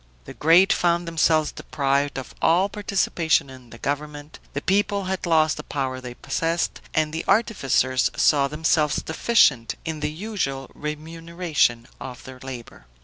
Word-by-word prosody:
The - - -9
great 170 +5 +5
found 175 0 +1
themselves 160 -2 +2
deprived 140 0 -1
of 130 - -7
all 180 +4 +3
participation 180 -8 0
in 130 -2 -14
the 115 - -12
government; 145 +2 -5
the 145 - -3
people 200 +1 +1
had 185 -1 -3
lost 155 -2 +3
the - - -6
power 130 -2 -3
they 125 -1 -8
possessed, 165 +5 -2
and 155 -1 +1
the 160 - -3
artificers 135 - +2
saw 140 -2 +4
themselves 150 0 +1
deficient 155 - +2
in 160 -1 -4
the 150 0 -1
usual 155 -7 -4
remuneration 155 -4 -2
of 125 -2 -8
their 130 -1 -11
labor. 125 - -9
155 Hz, 145 wpm, -23 LUFS, 135-170 Hz, -, great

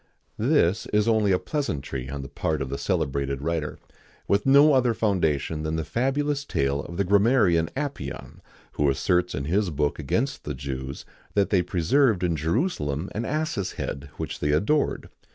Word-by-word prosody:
[XIX - - 0
86] - - +3
This 100 +4 +2
is 105 - +1
only 110 -3 +3
a 90 - +4
pleasantry 70 - -3
on 70 0 -5
the - - -7
part 80 +3 -2
of 65 - -7
the 70 - -4
celebrated 70 -4 -1
writer, 80 -1 -2 0.5
with 100 +5 +1
no 140 +2 +7
other 125 -3 +3
foundation 80 - 0
than 80 +1 -2
the 80 - -1
fabulous 140 - 0
tale 70 - 0
of 85 - -8
the 100 - +2
grammarian 100 -4 +3
Apion, 145 0 -5 0.3
who 75 -1 +1
asserts 90 +6 +1
in 70 - -3
his 95 +5 +1
book 75 -1 -1
against 115 - -1
the 75 - -4
Jews 65 0 -6 0.3
that 100 -1 +2
they 95 -3 +4
preserved 90 - +2
in 85 -2 +1
Jerusalem 80 - -1
an 115 +3 -3
ass's 140 - -2
head, 70 +1 -5
which - - -5
they 75 0 +1
adored. 125 - +1
90 Hz, 175 wpm, -25 LUFS, 75-115 Hz, 0.5 s, no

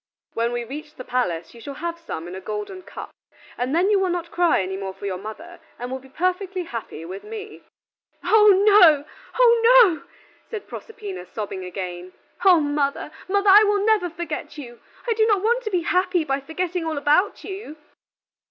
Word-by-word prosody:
When 230 +1 0
we 240 0 -2
reach 300 +5 -9
the 255 - -8
palace, 175 -11 -2
you 235 - -14
shall 280 +4 -7
have 335 +2 -5
some 170 - -6
in 175 - -8
a 190 - -7
golden 210 - -5
cup, - - -9 0.4
and 255 +4 -2
then 370 +5 +3
you 405 - +4
will 380 -1 +1
not 350 -1 -3
cry 350 -1 +3
any 190 +1 -4
more 190 -1 -5
for 195 - -9
your 185 -2 -3
mother, 320 - -9 0.2
and 245 +1 -6
will 260 - -3
be 265 +1 -17
perfectly 365 +3 -2
happy 230 - -7
with 190 +3 -8
me." 430 -1 -9 0.6
"Oh 430 -1 +5 0.2
no, 350 -9 +7 0.3
oh 470 -2 +6 0.2
no!" 325 -7 -1 0.5
said 440 -3 -6
Proserpina, 415 - -8
sobbing 195 -3 -6
again. 180 0 -6 0.3
"O 365 -3 +7
mother, 290 0 -1 0.2
mother, 400 +1 +3
I 415 +2 +9
will 410 -1 +1
never 425 -5 +2
forget 330 -2 -6
you; 240 -5 -10 0.3
I 465 - +2
do 440 0 +2
not 410 -3 +2
want 475 +3 +2
to - - -1
be 365 -4 0
happy 360 0 +1
by 275 -2 -1
forgetting 340 +5 -3
all 320 -2 -3
about 300 +8 +2
you." 380 -6 -8
325 Hz, 190 wpm, -23 LUFS, 240-385 Hz, 0.6 s, I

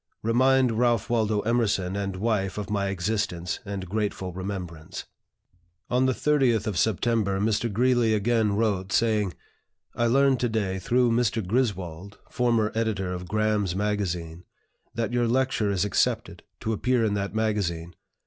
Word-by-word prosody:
"Remind 130 +2 +3
Ralph 120 -3 +1
Waldo 110 -3 +1
Emerson 105 -5 0
and 100 -1 -3
wife 100 -1 -1
of 105 0 -4
my 100 -1 0
existence 90 -2 -2
and 100 -2 -5
grateful 100 -2 -2
remembrance." 90 -4 -6 0.9
On 125 +1 +3
the - - +3
30th 130 -6 +2
of 105 -4 -2
September 105 0 +1
Mr. 110 +2 0
Greeley 120 0 +3
again 110 -1 +1
wrote, 100 -3 0
saying, 105 -5 +1 0.6
"I 120 - +1
learned 135 +1 +3
to 120 - 0
day, 100 -4 -1
through 120 +4 +2
Mr. 115 -3 +1
Griswold, 100 -4 -2
former 115 -3 +1
editor 105 -5 -1
of 90 0 -6
'Graham's 105 -3 0
Magazine,' 90 -5 -2 0.5
that 115 +1 -2
your 120 -1 +2
lecture 130 -3 +1
is 100 -1 +1
accepted, 105 - 0 0.2
to 110 - -1
appear 125 +1 +1
in 105 - 0
that 100 +1 -3
magazine. 95 -6 -1
105 Hz, 145 wpm, -26 LUFS, 95-115 Hz, 0.9 s, Remind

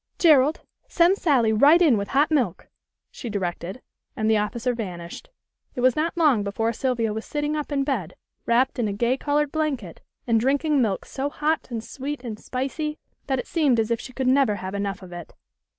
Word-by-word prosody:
"Gerald, 305 -2 +4 0.3
send 350 +2 +4
Sally 250 - +2
right 290 +10 +6
in 315 -9 +5
with 200 -1 -2
hot 285 +6 +2
milk," 245 - 0 0.4
she 240 - -7
directed, 190 +1 -4 0.3
and 220 - -1
the 220 - +4
officer 230 +4 -1
vanished. 180 - -7 0.5
It 245 - -3
was 255 -1 +4
not 330 +3 -1
long 295 -10 +4
before 225 +3 -1
Sylvia 230 -3 -1
was 220 +1 -4
sitting 295 0 -2
up 300 0 -4
in 275 -1 +1
bed 225 - -2 0.3
wrapped 250 +3 +2
in 230 - +1
a 200 - -2
gay 235 +5 +1
colored 290 +1 0
blanket 275 - -3 0.2
and 230 -2 +3
drinking 280 +4 +2
milk 210 -5 -1
so 275 +1 -3
hot 305 +1 -1
and 230 -3 -4
sweet 280 +1 -6
and 220 -3 -6
spicy 300 +4 -3 0.3
that 265 -1 +1
it - - -4
seemed 290 -8 +2
as 225 +1 0
if 230 - +1
she 255 - -9
could 260 +1 -3
never 260 -4 +3
have 190 0 -6
enough 200 -1 -3
of 180 -1 -11
it. 175 -1 -9
255 Hz, 200 wpm, -24 LUFS, 215-290 Hz, 0.5 s, right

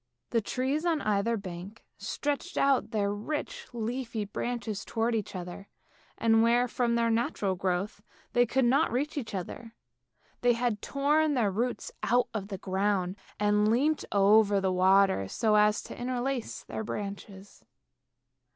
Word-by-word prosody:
The 230 - +2
trees 265 +8 -1
on 335 -3 +1
either 215 +2 +1
bank 190 +2 -8
stretched 290 -1 -3
out 275 -2 +3
their 205 -2 0
rich 305 - -4
leafy 235 -1 -3
branches 220 -1 -4
towards 230 +1 -1
each 210 -3 -3
other, 180 +2 -7 0.5
and 225 -1 +4
where, 240 +2 +3
from 235 -1 0
their 230 -1 +2
natural 225 -4 0
growth, 185 +3 -2 0.3
they 245 0 +4
could 260 +2 +2
not 275 +7 +3
reach 285 +6 -1
each 230 -8 -4
other, 225 +5 -6 0.7
they 245 0 +4
had 235 -3 -1
torn 295 +2 +2
their 220 -6 +2
roots 240 +6 -2
out 245 +1 +2
of 205 -3 -3
the 200 -2 -5
ground, 190 -1 0 0.2
and 210 0 +3
leant 295 +6 +2
over 205 0 +5
the 190 -1 0
water 190 - +4
so 215 - +1
as 210 0 +4
to - - -9
interlace 250 0 -3
their 220 - -5
branches. 200 -1 -7
225 Hz, 150 wpm, -29 LUFS, 200-245 Hz, 0.7 s, over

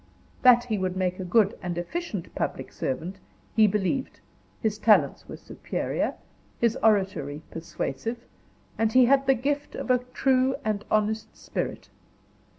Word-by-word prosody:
That 245 -1 +7
he 220 -4 -2
would 185 0 -2
make 185 0 -1
a - - -3
good 200 +2 +3
and 175 -2 -4
efficient 205 - -4
public - - -3
servant, 170 +9 -3 0.4
he 220 -1 +6
believed; 210 +7 -1 0.4
his 215 -1 -1
talents 210 -10 +3
were - - -7
superior, - - -3 0.4
his 235 -2 +2
oratory 190 -9 +1
persuasive, 165 - -4 0.6
and 225 -1 +2
he 255 -1 +7
had 275 +2 +3
the 270 - +5
gift 285 +4 -2
of - - -2
a 250 - +4
true 255 +1 +1
and 210 -1 -1
honest 215 +1 0
spirit. - - -4
215 Hz, 145 wpm, -26 LUFS, 185-250 Hz, 0.6 s, That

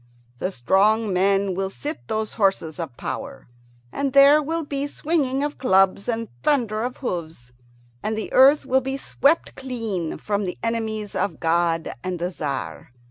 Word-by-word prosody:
The 185 - -2
strong 200 - +2
men 195 +1 +2
will 190 +1 -2
sit 295 +10 -6
those 220 -1 -2
horses 190 -6 0
of 150 -8 -6
power, - - -6 0.4
and 275 -2 -2
there 280 +2 +7
will 325 +2 -2
be 285 0 -2
swinging 285 -3 0
of 295 0 -3
clubs 195 -3 +3
and 230 -1 -1
thunder 230 -7 +1
of 245 +2 -3
hoofs, 160 - -5 0.5
and 220 0 -2
the 220 - -5
earth 275 +3 +6
will 265 0 +2
be 270 +1 -3
swept 285 +3 +1
clean 225 -11 -4
from 205 +4 -2
the 180 - -4
enemies 220 -2 -2
of 200 +2 -2
God 165 0 +1
and 185 -1 -3
the 175 +2 -3
Tzar. 140 -6 -5
215 Hz, 160 wpm, -23 LUFS, 185-270 Hz, 0.5 s, there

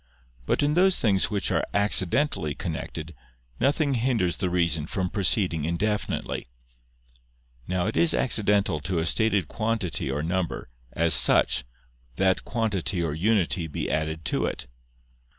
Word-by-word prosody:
But - - +1
in 145 +1 +2
those 185 +2 +4
things 100 -4 +2
which 105 -3 -1
are - - +1
accidentally 100 - +1
connected, 80 -2 -5 0.5
nothing 145 +1 +2
hinders 115 -9 +1
the 90 - -1
reason 85 -3 0
from 90 -1 -2
proceeding 95 -5 +1
indefinitely. 100 +3 -2 1.2
Now 90 -1 0
it 110 - -2
is 170 -1 +3
accidental 105 - +1
to 90 +3 -2
a 80 - 0
stated 100 -1 +1
quantity 110 - -2
or 70 +3 -2
number, 85 -5 -2 0.2
as 85 0 +2
such, - - +4 0.5
that 95 -1 +1
quantity 100 -6 -1
or 80 -3 -1
unity 90 -1 +1
be 75 - -4
added 80 0 -2
to - - +1
it. - - -4
95 Hz, 135 wpm, -26 LUFS, 80-110 Hz, 1.2 s, those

